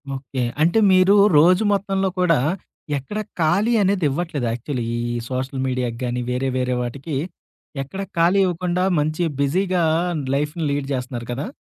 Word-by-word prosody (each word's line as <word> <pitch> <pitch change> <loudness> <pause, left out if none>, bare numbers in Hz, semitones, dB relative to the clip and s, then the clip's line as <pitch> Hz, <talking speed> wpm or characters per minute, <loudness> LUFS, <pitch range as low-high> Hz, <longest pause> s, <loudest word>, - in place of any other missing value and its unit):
Okay. 135 -1 -5 0.2
అంటే 170 +7 +4
మీరు 185 +2 +5 0.2
రోజు 180 +6 +5
మొత్తంలో 195 -1 0
కూడా, 170 -3 +4 0.6
ఎక్కడ 205 +11 -5 0.2
ఖాళీ 185 +9 +2
అనేది 190 -4 +1
ఇవ్వట్లేదు 145 -4 -2
యాక్చువల్లీ 120 +1 -3
ఈ - - -2 0.3
సోషల్ 130 +1 -3
మీడియాకి 125 -2 -2
గాని, 125 0 -2
వేరే 130 +1 -1
వేరే 125 0 0
వాటికి, 135 +5 -5 0.7
ఎక్కడ 190 +9 -7 0.2
ఖాళీ 175 +4 +4
ఇవ్వకుండా 180 0 -1 0.2
మంచి 155 +3 -1 0.2
బిజీగా 180 +5 +1 0.5
లైఫ్‌ని 150 +3 -2
లీడ్ 140 -1 -2
జేస్తున్నారు 125 -2 -4
కదా! 135 - -3
150 Hz, 140 wpm, -21 LUFS, 130-180 Hz, 0.7 s, మీరు